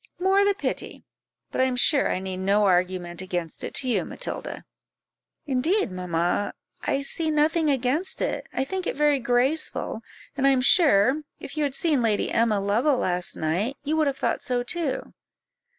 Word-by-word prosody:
"More 385 +2 +3
the 405 0 +2
pity; 445 - -4 0.5
but - - 0
I - - +4
am 255 -1 -1
sure 275 +3 +4
I - - 0
need 190 0 -5
no 200 +2 +2
argument 180 -1 0
against 175 -3 -4
it - - -5
to 260 - +2
you, 245 - +1
Matilda." - - -6 0.8
"Indeed, 290 - 0
mamma, 180 +1 -1 0.3
I 275 - -1
see 315 +3 0
nothing 310 +1 +2
against 275 +7 0
it - - -2
I 265 - -1
think 375 +5 -4
it - - -2
very 295 -1 +3
graceful; 245 0 0 0.3
and 275 -1 +2
I - - +6
am 265 -2 +3
sure, 270 - +4 0.2
if 280 - -8
you 305 - -1
had 280 -2 -1
seen 300 -5 +1
Lady 220 -3 0
Emma 225 -3 +2
Lovell 230 +8 +1
last 180 -5 -1
night, 190 - -1
you 300 +2 -1
would 310 -2 +2
have 275 -1 -1
thought - - -1
so 245 -1 -1
too." 295 +2 -3
260 Hz, 180 wpm, -25 LUFS, 200-300 Hz, 0.8 s, I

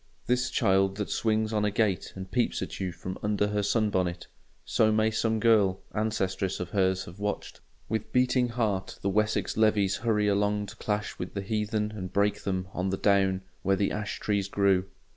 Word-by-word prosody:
This 125 +1 +1
child 95 0 +2
that 105 - -3
swings 110 0 +1
on 105 -1 +1
a 105 - +2
gate 100 -2 0
and 95 -1 -8
peeps 120 +4 0
at - - -7
you 95 -2 -2
from 90 +2 -7
under 105 0 +1
her 105 0 0
sun 105 +1 +1
bonnet—so 95 +4 -1
may 110 +1 +2
some 110 0 0
girl 105 -5 +3
ancestress 100 -3 -1
of 90 0 -5
hers 95 -2 +1
have 85 +3 -12
watched 105 0 -4 0.3
with 110 0 -3
beating 125 0 +2
heart 110 -5 -1
the 100 - +1
Wessex 105 +2 0
levies 105 -3 +3
hurry 105 -1 +1
along 105 +1 +1
to - - -10
clash 105 0 -3
with - - -6
the 100 - -2
heathen 105 +1 -1
and 95 -3 -5
break 100 +1 +1
them 95 -1 -2
on 90 +1 -1
the 95 - -1
down 95 -2 +2 0.2
where 95 - +2
the 100 +1 0
ash 105 0 -3
trees 100 -2 0
grew. 100 -2 +2
105 Hz, 190 wpm, -28 LUFS, 95-110 Hz, 0.3 s, girl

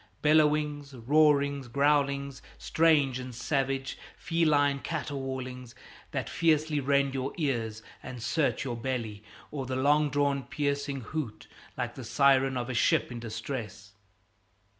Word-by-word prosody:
Bellowings, 150 -2 +2
roarings, 140 +1 +3
growlings, 140 0 +1 0.2
strange 150 -6 +2
and 125 -1 -7
savage; 135 +1 -1 0.2
feline 150 -4 +2
caterwaulings 130 -5 -5 0.3
that - - -3
fiercely 155 -2 +2
rend 140 0 +2
your 135 0 -3
ears 115 -8 -2 0.2
and 130 -1 -8
search 140 +4 0
your 120 -3 -3
belly, 115 -4 -4 0.3
or 135 -4 -4
the 130 - -2
long 145 +3 +3
drawn 140 0 +1
piercing 140 +1 -2
hoot 125 -2 -5 0.3
like - - -2
the - - -8
siren 135 -1 +3
of 120 -1 -3
a 130 - -3
ship 120 - +2
in 120 - -5
distress. 110 -3 -6
140 Hz, 125 wpm, -29 LUFS, 125-145 Hz, 0.3 s, roarings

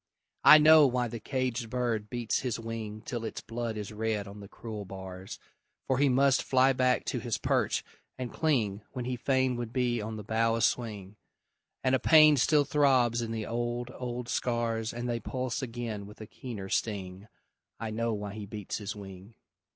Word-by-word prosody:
I 155 - +10
know 155 -1 +8
why 125 -1 0
the 115 0 -6
caged 125 -1 -2
bird 115 -3 -1
beats 120 -1 -1
his 125 -3 -2
wing 110 -2 -6
Till 120 -2 -4
its 110 - -4
blood 115 -1 -4
is 105 0 -6
red 110 -1 -2
on 100 +1 -10
the 100 - -10
cruel 110 0 -7
bars; 95 0 -8 0.5
For 130 -1 +1
he 140 -1 +4
must 135 +1 +4
fly 130 +1 +3
back 125 0 +2
to 125 - -2
his 120 -1 -2
perch - - 0 0.3
and 125 -2 -5
cling 110 -11 0
When 125 -3 -4
he 125 0 -2
fain 130 +1 +1
would 120 -2 -4
be 120 -2 0
on 110 +1 -5
the 105 - -6
bough 115 +2 +1
a 115 - -2
swing; 105 -4 -1 0.7
And 130 - +2
a 130 - +4
pain 155 +2 +7
still 145 +3 +4
throbs 130 -6 +3
in 115 - -3
the 110 -2 -3
old, 120 +1 -3
old 125 -1 -5
scars 115 -2 -1
And 120 +1 -4
they 120 -1 -1
pulse 130 0 -3
again 115 -5 -5
with 105 - -13
a 110 - -7
keener 110 -4 -7
sting 95 -1 -3 0.5
I 115 -1 -4
know 115 +1 -1
why 105 -2 -4
he 105 -1 -7
beats 105 0 -5
his 105 +1 -5
wing! 95 +1 -11
115 Hz, 190 wpm, -29 LUFS, 105-125 Hz, 0.7 s, I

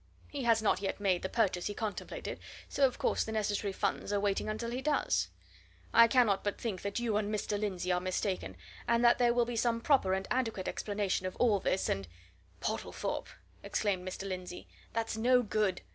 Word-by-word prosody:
He 280 -4 -4
has 225 -1 +4
not 205 - +2
yet 195 - -2
made 190 -3 +2
the 190 - -3
purchase 195 -6 +1
he 205 - -4
contemplated, 215 -3 -4 0.3
so 275 -1 +3
of 255 - -7
course - - +1
the 220 - -5
necessary 210 -1 0
funds 195 - -2
are 205 - +2
waiting 200 +1 0
until 225 +2 -3
he 250 +2 -3
does. 300 +1 +1 0.7
I 230 0 +8
cannot 230 -6 +3
but 205 - -2
think 210 -6 -3
that 200 0 -3
you 230 -3 0
and 210 0 -1
Mr. 210 -1 -1
Lindsey 185 -3 -1
are 180 - +2
mistaken, 185 - -2 0.3
and 235 +1 +3
that 235 - +6
there 240 -1 +5
will 240 0 +3
be 240 0 -4
some 230 0 +1
proper 230 -7 +3
and 190 0 -3
adequate 225 -7 -1
explanation 200 -3 -1
of 185 - -6
all 220 -5 +3
this, 190 - 0
and 100 -2 -1 0.3
" 90 0 -31
"Portlethorpe!" - - -3 0.3
exclaimed 195 -4 -1
Mr. 185 +1 -5
Lindsey, 180 -1 -6 0.2
"that's 225 -1 -2
no 250 +2 +4
good. 210 -3 0
210 Hz, 200 wpm, -32 LUFS, 190-235 Hz, 0.7 s, I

